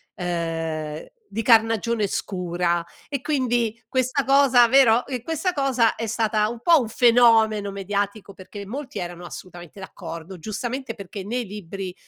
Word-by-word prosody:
ehm, 165 Hz, -3 st, -3 dB, 0.2 s
di 225 Hz, -, -3 dB
carnagione 225 Hz, -1 st, +3 dB
scura 175 Hz, -3 st, -2 dB, 0.2 s
e 280 Hz, -, -2 dB
quindi 240 Hz, -5 st, -1 dB
questa 260 Hz, +2 st, 0 dB
cosa, 270 Hz, -3 st, +5 dB
vero 245 Hz, -3 st, +5 dB, 0.2 s
questa 325 Hz, +5 st, -1 dB
cosa 260 Hz, -6 st, +2 dB
è 230 Hz, -, -4 dB
stata 215 Hz, -1 st, +1 dB
un 230 Hz, +1 st, -6 dB
po' 335 Hz, +3 st, +5 dB
un 240 Hz, -, -2 dB
fenomeno 225 Hz, -3 st, +4 dB
mediatico, 200 Hz, +1 st, -3 dB
perché 200 Hz, +2 st, -10 dB
molti 265 Hz, +6 st, -6 dB
erano 175 Hz, 0 st, -6 dB
assolutamente 175 Hz, +1 st, -10 dB
d'accordo, 170 Hz, -1 st, -8 dB
giustamente, 235 Hz, -, -4 dB
perché 200 Hz, -2 st, -8 dB
nei 245 Hz, +4 st, -2 dB
libri 195 Hz, -2 st, -7 dB
215 Hz, 135 wpm, -23 LUFS, 185-245 Hz, 0.2 s, cosa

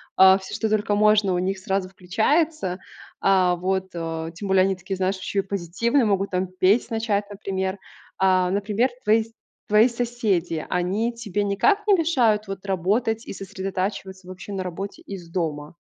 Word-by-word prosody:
а, 190 Hz, 0 st, +7 dB
всё, 190 Hz, -, -7 dB
что 220 Hz, -, -1 dB
только 210 Hz, -1 st, +1 dB
можно, 210 Hz, -2 st, +4 dB
у -, -, +1 dB
них 190 Hz, +1 st, -1 dB
сразу 190 Hz, -2 st, -2 dB
включается. 210 Hz, -, 0 dB, 0.4 s
А. 185 Hz, -2 st, +4 dB
Вот, 190 Hz, +1 st, -1 dB
э, 165 Hz, -1 st, -4 dB
тем 200 Hz, +2 st, -6 dB
более, 190 Hz, -1 st, +4 dB
они 195 Hz, 0 st, +1 dB
такие, 190 Hz, +1 st, -5 dB
знаешь, 190 Hz, +1 st, -1 dB
ещё 195 Hz, +1 st, -2 dB
и -, -, +4 dB
позитивные. 200 Hz, -, 0 dB
Могут, 195 Hz, -1 st, 0 dB
там, 185 Hz, 0 st, 0 dB
петь 185 Hz, +6 st, +2 dB
начать, 215 Hz, -3 st, -1 dB
например. 195 Hz, -1 st, -3 dB, 0.4 s
А. 185 Hz, -1 st, +3 dB
Например, 205 Hz, +5 st, +1 dB
твои 220 Hz, +1 st, +4 dB
с 225 Hz, -, -19 dB, 0.4 s
твои 215 Hz, +3 st, +6 dB
соседи, 225 Hz, -9 st, -1 dB
они 195 Hz, +7 st, 0 dB
тебе 205 Hz, -3 st, -3 dB
никак 395 Hz, -, +2 dB
не 410 Hz, -, +6 dB
мешают 245 Hz, -, +2 dB
вот 195 Hz, 0 st, -7 dB
работать 210 Hz, +5 st, 0 dB
и -, -, -6 dB
сосредотачиваться 190 Hz, -1 st, -5 dB
вообще 185 Hz, +2 st, -9 dB
на 190 Hz, -, -2 dB
работе 185 Hz, +2 st, -6 dB
из 180 Hz, -4 st, -9 dB
дома? 155 Hz, -3 st, -3 dB
195 Hz, 170 wpm, -24 LUFS, 185-215 Hz, 0.4 s, а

